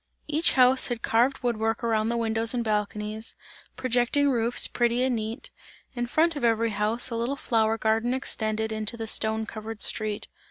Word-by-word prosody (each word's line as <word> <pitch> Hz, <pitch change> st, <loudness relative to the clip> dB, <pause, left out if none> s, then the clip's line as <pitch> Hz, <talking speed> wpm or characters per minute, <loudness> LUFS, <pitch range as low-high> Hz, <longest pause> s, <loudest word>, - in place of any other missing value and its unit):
Each 310 Hz, +3 st, +2 dB
house 255 Hz, 0 st, +5 dB
had 240 Hz, -2 st, -4 dB
carved 250 Hz, +4 st, +1 dB
wood 240 Hz, -2 st, 0 dB
work 225 Hz, +2 st, -1 dB
around 225 Hz, -1 st, +1 dB
the 235 Hz, -, -1 dB
windows 225 Hz, +1 st, +1 dB
and 240 Hz, -, -1 dB
balconies, 210 Hz, 0 st, -2 dB, 0.4 s
projecting 255 Hz, +3 st, +2 dB
roofs, 235 Hz, -1 st, +2 dB
pretty 240 Hz, +1 st, 0 dB
and 260 Hz, -1 st, +1 dB
neat; 220 Hz, +2 st, -5 dB, 0.4 s
in 240 Hz, -1 st, -2 dB
front 325 Hz, +6 st, +2 dB
of 290 Hz, -, -5 dB
every 230 Hz, -1 st, +2 dB
house 215 Hz, +4 st, +1 dB
a -, -, -2 dB
little 235 Hz, +4 st, -1 dB
flower 225 Hz, -4 st, 0 dB
garden 225 Hz, +2 st, +1 dB
extended 220 Hz, -4 st, -1 dB
into 215 Hz, +1 st, -3 dB
the 225 Hz, -, -4 dB
stone 220 Hz, 0 st, +1 dB
covered 220 Hz, 0 st, -6 dB
street. 215 Hz, -2 st, -3 dB
230 Hz, 175 wpm, -26 LUFS, 220-245 Hz, 0.4 s, house